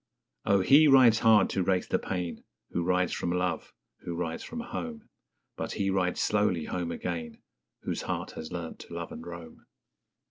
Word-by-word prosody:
_Oh, 100 -2 +3
he 150 +3 +7
rides 125 -5 +7
hard 110 -4 +6
to 95 - 0
race 90 0 +1
the - - 0
pain 90 -2 -4 0.3
Who 85 - -1
rides 90 0 +1
from 85 - -2
love, 90 -2 -1 0.3
who 85 - -5
rides 85 -1 -3
from 240 0 -6
home; 240 -1 -6 0.5
But - - -4
he 100 -1 0
rides 90 -2 0
slowly 105 -6 +1
home 85 -2 -3
again, 85 -2 -5 0.4
Whose - - -2
heart - - -3
has 80 +1 -8
learnt 85 -2 -6
to - - -11
love - - -5
and 80 - -8
roam. 85 -1 -10
90 Hz, 175 wpm, -29 LUFS, 85-105 Hz, 0.5 s, he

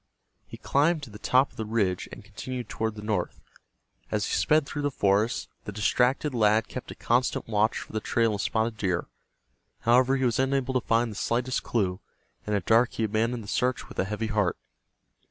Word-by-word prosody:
He - - -9
climbed 150 +2 +1
to 120 - -8
the 105 - -10
top 130 +4 +3
of - - -22
the 110 - -2
ridge 100 -5 0
and - - -10
continued 120 +3 -6
toward 110 -1 -2
the 105 - -8
north. 105 -5 -2 0.7
As 105 -1 0
he - - -2
sped 155 -1 +3
through 145 +1 -4
the 145 - +1
forest, 105 0 +1 0.2
the - - -5
distracted 125 +7 +1
lad 110 -1 +3
kept 125 - -7
a - - -7
constant 125 +2 0
watch 110 0 +2
for - - -8
the 110 - 0
trail 115 0 +1
of 100 - -2
Spotted 110 0 0
Deer. 95 -3 0 0.8
However, 125 +3 +4
he 130 - 0
was 120 -1 +1
unable 135 -1 +1
to 130 - +2
find 115 +1 +1
the - - -8
slightest 125 +4 0
clue, 95 -5 -1 0.5
and 105 - +1
at 100 -4 -1
dark 115 +2 +4
he 115 - -2
abandoned 115 +2 0
the - - -11
search 125 +2 -1
with - - -8
a - - +2
heavy 105 +3 -3
heart. 105 -5 0
115 Hz, 205 wpm, -27 LUFS, 105-125 Hz, 0.8 s, However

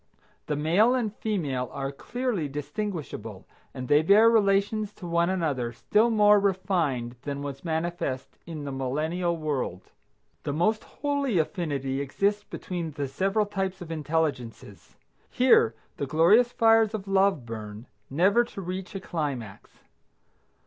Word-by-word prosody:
The 150 - 0
male 180 - +3
and 220 -5 -2
female 145 - -2
are 135 -1 -4
clearly 235 - -3
distinguishable, 150 - -5 0.3
and 130 -2 -6
they 145 +3 +5
bear 210 +7 +6
relations 205 0 +1
one 170 -2 +1
to 185 - +1
another 140 -9 -1
still 210 - +2
more 210 -2 +5
refined 170 - 0
than 140 -1 -4
was 140 -1 -6
manifest 160 -5 -3
in 160 -3 -6
the 140 - -4
Millennial 155 +7 -1
World. 140 - -3 0.5
The 145 - -3
most 215 +8 +1
holy 285 -7 -1
affinity 145 -6 -1
exists 200 +9 0
between 175 -5 -5
the 145 -2 -4
several 195 +10 0
types 195 -2 -3
of 175 -3 -8
intelligences. 150 -7 -3 0.3
Here 250 - +4 0.2
the 140 - -3
glorious 195 - +5
fires 225 -2 +4
of 200 -2 -6
love 195 -8 +2
burn 110 -1 -7 0.2
never 190 - +4
to 235 - -9
reach 185 +1 -5
a - - -2
climax. 140 - -5
170 Hz, 135 wpm, -27 LUFS, 140-205 Hz, 0.5 s, bear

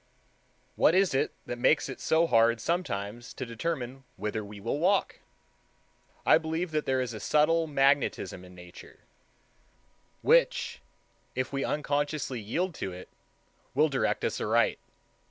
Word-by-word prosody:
What 165 - +5
is 190 -3 +3
it 135 - +1
that 120 - -5
makes 150 +5 +3
it 135 - -8
so 160 +1 +3
hard 115 -5 +4
sometimes 115 - -3
to 130 - -4
determine 130 +1 -4
whither 105 +2 -3
we 105 0 -10
will 115 +8 -2
walk? 190 +4 +1 1.1
I - - +6
believe 160 +2 -3
that 155 -1 -1
there 130 -1 +2
is 125 -2 -3
a 110 - -6
subtle 160 +6 +2
magnetism 135 - +1
in 90 0 -14
Nature, 90 0 -13 1.2
which, - - +3 0.5
if 130 +2 -2
we 135 0 -1
unconsciously 145 -3 -1
yield 165 - -2
to 95 - -2
it, 90 +1 -10 0.7
will 155 +3 +4
direct 135 -1 0
us - - -2
aright. - - +2
135 Hz, 140 wpm, -29 LUFS, 115-160 Hz, 1.2 s, I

